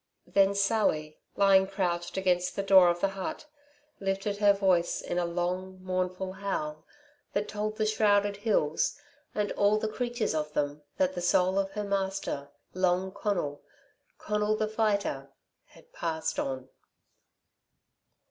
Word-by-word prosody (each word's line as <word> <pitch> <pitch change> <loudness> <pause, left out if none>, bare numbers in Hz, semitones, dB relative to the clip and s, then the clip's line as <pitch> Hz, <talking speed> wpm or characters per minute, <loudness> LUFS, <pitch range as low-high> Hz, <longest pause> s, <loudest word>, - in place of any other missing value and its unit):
Then 195 0 +3
Sally, 195 -7 +1 0.2
lying 195 -1 +5
crouched 180 -3 -2
against 180 -1 +1
the 200 - -1
door 190 -2 +7
of 175 0 -1
the 195 - +3
hut, 195 +13 -5 0.5
lifted 195 +1 -1
her 205 -1 +5
voice 190 -4 +2
in 175 - -2
a 175 - +1
long, 180 +2 -2
mournful 185 0 -2
howl 155 -6 -4 0.5
that 205 +1 0
told 215 0 -3
the 215 - +1
shrouded 205 -1 +2
hills 200 -8 +1 0.4
and 210 -1 0
all 205 +1 +3
the 220 - -1
creatures 240 -1 -2
of 150 -1 -2
them 145 0 -1 0.2
that 185 0 +2
the 175 - -4
soul 185 +2 +3
of 195 0 -2
her 210 0 -3
master, 195 -7 -2 0.2
Long 185 0 +1
Conal 175 -9 -2 0.6
Conal, 210 0 0
the 215 0 0
Fighter 205 -11 0 0.4
had - - -20
passed 160 -2 -2
on. 130 -1 -3
190 Hz, 140 wpm, -29 LUFS, 175-205 Hz, 0.6 s, door